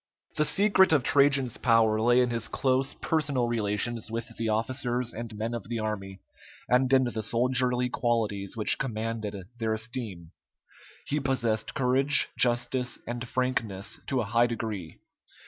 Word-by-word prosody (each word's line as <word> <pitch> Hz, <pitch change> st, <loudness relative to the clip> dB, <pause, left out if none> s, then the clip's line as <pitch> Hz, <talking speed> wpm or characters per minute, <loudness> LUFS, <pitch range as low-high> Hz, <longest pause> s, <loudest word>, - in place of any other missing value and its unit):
The 150 Hz, -, +2 dB
secret 195 Hz, +1 st, +4 dB
of 145 Hz, -5 st, +3 dB
Trajan's 140 Hz, -3 st, +4 dB
power 115 Hz, -2 st, +3 dB
lay 120 Hz, +2 st, +4 dB
in 125 Hz, -1 st, +1 dB
his 115 Hz, -1 st, -1 dB
close 130 Hz, +2 st, 0 dB
personal 140 Hz, -6 st, 0 dB
relations 110 Hz, 0 st, -1 dB
with 115 Hz, +1 st, -5 dB
the 115 Hz, -1 st, -2 dB
officers 120 Hz, +2 st, -1 dB
and 115 Hz, -1 st, -7 dB
men 115 Hz, +2 st, -3 dB
of 115 Hz, -3 st, -6 dB
the 120 Hz, -, -2 dB
army, 95 Hz, -3 st, -4 dB, 0.5 s
and 125 Hz, +2 st, +2 dB
in 130 Hz, -1 st, +5 dB
the 120 Hz, -3 st, -2 dB
soldierly 125 Hz, +2 st, +1 dB
qualities 110 Hz, -5 st, -1 dB
which 105 Hz, -, 0 dB
commanded 110 Hz, -4 st, -3 dB, 0.2 s
their 110 Hz, -1 st, 0 dB
esteem. 110 Hz, -7 st, -6 dB, 0.7 s
He 150 Hz, -, -1 dB
possessed 120 Hz, -5 st, -1 dB
courage, 135 Hz, +2 st, +3 dB
justice, 125 Hz, +1 st, +1 dB
and 120 Hz, +1 st, -5 dB
frankness 115 Hz, -6 st, -2 dB
to 130 Hz, -2 st, 0 dB
a -, -, -3 dB
high 120 Hz, +3 st, +3 dB
degree. 110 Hz, -8 st, -5 dB
120 Hz, 145 wpm, -27 LUFS, 110-130 Hz, 0.7 s, in